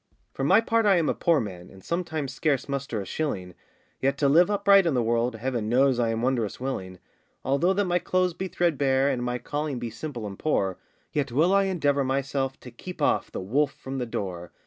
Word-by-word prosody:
For - - -4
my - - +5
part 230 -1 +1
I 195 - +6
am 165 -3 +2
a - - +2
poor 170 -3 +2
man, 90 -6 -6
And 95 -1 -15
sometimes 160 -5 -3
scarce 150 -5 0
muster 140 -6 -3
a - - -6
shilling, 95 -9 -3 0.5
Yet 135 +1 +1
to 140 - +2
live 170 +7 +5
upright 200 -2 +5
in 155 - +1
the 120 - +2
world, 115 +1 0
Heaven 115 -2 -2
knows 130 +1 +3
I 115 -1 +2
am 115 +1 -2
wondrous 125 -5 0
willing. 95 -9 -4 0.5
Although 140 +8 +2
that 200 +1 +1
my 175 0 +1
clothes 185 0 +1
be 190 +3 -4
threadbare, 140 -6 +1
And 125 -3 -1
my 125 0 -1
calling 145 +3 -3
be 120 -1 -5
simple 120 0 -6
and 100 -2 -7
poor, 95 - 0 0.3
Yet 140 -4 -1
will 160 +9 +3
I 200 0 +4
endeavour 145 -7 +1
myself 135 0 -1
To 125 - -10
keep 180 +10 -9
off - - +1
the - - -5
wolf 140 +9 +1
from 135 0 -6
the 125 - -3
door. 90 -5 -5
135 Hz, 215 wpm, -26 LUFS, 120-165 Hz, 0.5 s, I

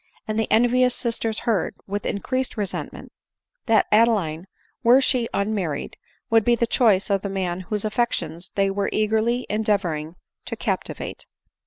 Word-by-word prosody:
and 215 0 -1
the'envious 245 +3 +3
sisters 230 -2 -1
heard, 220 -6 0
with 205 +1 -3
increased 255 +6 -2
resentment, 205 -3 -4 0.6
that 225 -2 +4
Adeline, 200 -7 +2 0.3
were 245 +3 +6
she 250 -3 +1
unmarried, 200 -7 -2 0.4
would 225 -1 +5
be 240 +1 +4
the 235 - +1
choice 210 -5 +2
of 195 -1 +2
the 200 - -4
man 185 -2 -2
whose 205 +3 -2
affections 205 -6 -2
they 195 -1 +2
were 200 0 -1
eagerly 220 +3 +1
endeavoring 185 -7 -1 0.3
to - - -4
cap - - -1
tivate. - - -7
215 Hz, 145 wpm, -23 LUFS, 195-235 Hz, 0.6 s, were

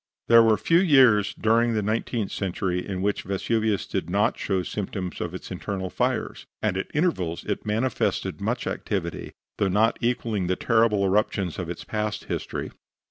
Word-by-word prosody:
There 115 0 +9
were 110 -1 +4
few 165 +1 +3
years 130 - +5
during 115 +1 +2
the 105 - 0
nineteenth 110 0 -1
century 90 -1 -2
in 95 -2 -4
which 105 0 0
Vesuvius 105 +2 0
did 80 - -3
not 100 +3 +2
show 95 -2 -1
symptoms 95 -2 -4
of 90 0 -4
its 95 - -8
internal 95 0 -4
fires, - - -2
and - - 0
at 95 - -3
intervals 95 - 0
it - - -4
manifested 115 +4 -1
much - - -1
activity, - - -3 0.3
though 100 - +3
not 105 +5 +2
equaling 115 -5 0
the 95 - +1
terrible 110 -2 +2
eruptions 95 -2 0
of 90 -2 -4
its 85 - -6
past 105 -1 -3
history. - - -4
105 Hz, 165 wpm, -25 LUFS, 95-115 Hz, 0.3 s, There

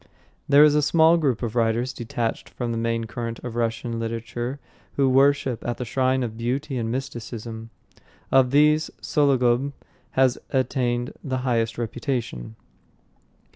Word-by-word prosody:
There 145 +1 +8
is 150 -1 +6
a 150 - +3
small 160 +3 +5
group 135 -8 0
of 115 -1 -3
writers 120 +2 +1
detached 120 -1 -3
from 120 -2 -4
the 115 - -2
main 115 0 -1
current 115 0 -5
of 125 -2 -6
Russian 115 0 -2
literature 115 +3 -4 0.4
who 140 -1 +3
worship 135 -2 +3
at 120 -1 -3
the 125 - -4
shrine 130 +1 +1
of 115 -2 -4
beauty 130 +5 -2
and 115 -1 -2
mysticism. 115 -3 -6 0.6
Of 130 -1 +5
these 150 +3 +4
Sologub 135 -2 +2 0.4
has 130 -1 +3
attained 125 -2 0
the 130 -3 -2
highest 115 -2 0
reputation. 120 - -4
125 Hz, 140 wpm, -24 LUFS, 115-135 Hz, 0.6 s, There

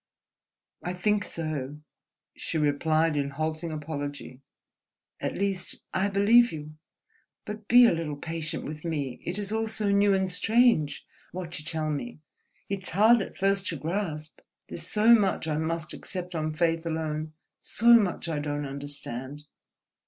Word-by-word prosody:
"I 175 - -3
think 205 +3 +1
so," 150 -5 -4 0.6
she 165 - -4
replied 155 +2 +2
in 140 -1 0
halting 155 +3 -3
apology—"at 145 -3 -8
least, 195 -2 -2
I 190 +2 +2
believe 210 +5 +5
you. 155 -1 -7 0.7
But 210 0 -7
be 245 +1 +8
a - - +5
little 165 -3 -3
patient 160 +1 -5
with 150 0 -7
me. 145 -7 -3
It 175 +3 -3
is 205 -1 -4
all 220 0 0
so 215 -2 -1
new 200 0 +4
and 190 -1 0
strange, 220 - +2 0.3
what 175 -2 -5
you 155 - -11
tell 155 -2 -1
me, 235 +12 -4 0.5
it's 195 -1 -2
hard 220 +5 +5
at - - -7
first 195 0 +1
to 165 - -2
grasp, 160 0 -4 0.3
there's 165 0 -4
so 220 +2 +5
much 200 -7 +2
I 150 -1 0
must 160 0 -2
accept 180 -1 -5
on 155 -1 -2
faith 165 0 +1
alone, 155 -1 -3 0.3
so 235 +2 +4
much 200 -6 +1
I 160 -3 -1
don't 145 0 -3
understand 140 0 -5
165 Hz, 150 wpm, -27 LUFS, 150-200 Hz, 0.7 s, be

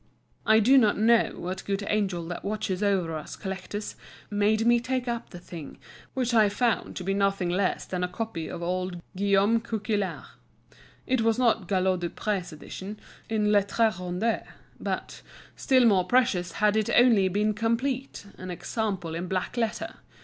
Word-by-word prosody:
I 220 0 +6
do 260 +5 +6
not 215 -4 +3
know 230 +2 +4
what 185 +1 -5
good 200 0 -2
angel 190 -5 0
that 175 - -5
watches 200 -2 -2
over 190 -5 +1
us 155 - -6
collectors 195 +2 -5 0.4
made 210 +2 +2
me 240 0 +5
take 255 +1 -2
up 235 -1 -3
the 175 - -9
thing, 170 -4 -9 0.4
which 250 -2 0
I 215 -3 +5
found 230 +3 0
to 185 - -5
be 195 +2 0
nothing 195 -2 +1
less 185 +1 0
than 180 -1 -3
a - - +1
copy 180 -3 -4
of 170 - -6
old 180 0 -2 0.2
Guillaume 200 +3 +3
Coquillart. 215 -3 -2 0.8
It 260 -2 +1
was 225 0 +2
not 230 -6 +2
Galliot 185 -1 +1
du 175 -1 -2
Pré's 195 -3 -3
edition, 190 +6 -8 0.3
in 210 -1 +1
lettres 210 +1 +2
rondes, 180 +6 -1 0.4
but, - - -4 0.3
still 260 -2 +3
more 195 -5 +4
precious 185 -7 +2
had 210 0 +2
it 220 -1 +1
only 230 -6 +6
been 210 +3 +1
complete, 235 +3 -2
an 185 - -7
example 180 -1 -3
in 170 +2 -3
black 185 +4 -2
letter. 230 -2 -2
205 Hz, 165 wpm, -27 LUFS, 185-225 Hz, 0.8 s, I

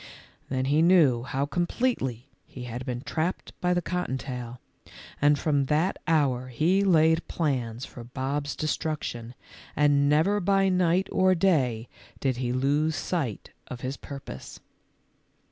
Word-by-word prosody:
Then 130 0 -1
he 145 +3 +3
knew 165 -9 +5
how 135 +2 -2
completely 145 - -1 0.2
he 125 - -9
had 125 +1 -6
been 125 -1 -3
trapped 160 +6 -3
by 180 0 +2
the 175 - 0
cotton 180 -7 -2
tail, 125 -2 -6 0.6
and 145 0 +5
from 145 -2 +1
that 155 +7 +1
hour 135 -6 +2
he 165 +10 +2
laid 160 -3 +3
plans 125 -7 -2
for 120 - -10
Bob's 140 +4 -3
destruction, 150 -7 -3 0.4
and 145 -1 +3
never 160 +8 +3
by 195 0 +2
night 180 0 +2
or 185 0 +3
day 130 -11 +1 0.3
did 130 -3 0
he 125 -1 -1
lose 145 +5 +1
sight 145 - -3 0.2
of 125 -1 -8
his 130 +2 -3
pur 140 -1 -8
pose. 65 - -9
145 Hz, 145 wpm, -27 LUFS, 125-170 Hz, 0.6 s, knew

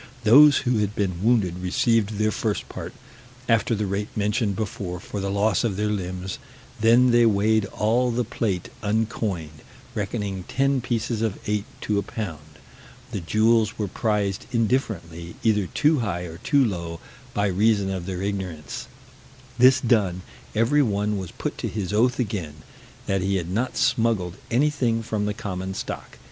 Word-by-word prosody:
Those 140 +6 +8
who 120 -3 +2
had 105 0 -1
been 90 -4 -1
wounded 105 -7 +2
received 105 +3 +1
their 110 0 +2
first 105 -2 -2
part, - - -7 0.6
after 115 0 +2
the 105 0 -1
rate 100 +2 -2
mentioned 105 0 0
before, 95 -4 -4
for 100 - -6
the 100 0 -2
loss 100 +1 +2
of 105 -5 -1
their 105 0 0
limbs: 95 -2 -4 0.4
then 120 +3 +5
they 120 0 +5
weighed 110 0 +3
all 115 +5 +1
the 120 +1 0
plate 105 -5 -2
uncoined, 105 -8 -2 0.3
reckoning 100 -2 -3
ten 135 -1 +1
pieces 120 -2 -2
of 110 -3 -1
eight 105 0 -1 0.2
to 105 -1 0
a - - 0
pound; 80 - -7 0.5
the - - -2
jewels 110 +4 +2
were 105 - -1
prized 100 -1 -1
indifferently, 100 -9 -1
either 105 -4 +2
too 150 - +2
high 95 -7 -2
or 85 -1 -8
too 140 - +3
low, 85 -5 -4 0.4
by 105 - +2
reason 100 0 +2
of 95 -2 -4
their 95 -1 -3
ignorance: 95 -7 -4 0.7
this 130 +2 +7
done, 100 -7 +1 0.3
every 115 +7 +3
one 105 -4 0
was 95 -3 -6
put - - -5
to - - -2
his 100 -3 -3
oath 120 +3 +3
again, 95 - -3 0.5
that 95 -1 0
he 100 +1 0
had 90 -2 -2
not 120 +6 -1
smuggled 115 -8 +1
anything 125 -3 +1
from 110 -2 -2
the 105 - -1
common 95 -1 -4
stock. - - -6
105 Hz, 160 wpm, -24 LUFS, 95-115 Hz, 0.7 s, Those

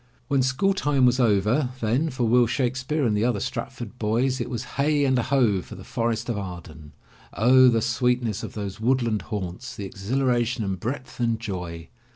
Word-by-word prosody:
When 140 -2 +3
school 135 +10 +2
time 145 -8 +2
was 125 +1 +3
over, 115 +4 +2
then 125 +8 +1
for 130 -2 -3
Will 120 +1 +4
Shakespeare 130 +4 -1
and 110 -3 +2
the 105 - +1
other 120 -3 +1
Stratford 120 0 -5
boys 120 +4 0
it 120 - -3
was 120 -1 -3
Heigh 145 +1 +2
and 130 -2 +2
a - - +2
Ho! 120 -7 +2
for - - -11
the - - -10
Forest 115 0 -2
of 115 -4 -2
Arden. 80 -5 -9 0.4
O, 130 +3 +6
the 115 -3 +3
sweetness 120 -2 0
of - - -7
those 100 -2 -5
woodland 120 -3 +1
haunts, 105 +5 -5
the 100 - -5
exhilaration 120 +4 0
and 95 -2 -3
breadth 130 +6 -5
and 115 -2 +1
joy! 90 -6 -6
120 Hz, 190 wpm, -25 LUFS, 105-130 Hz, 0.4 s, O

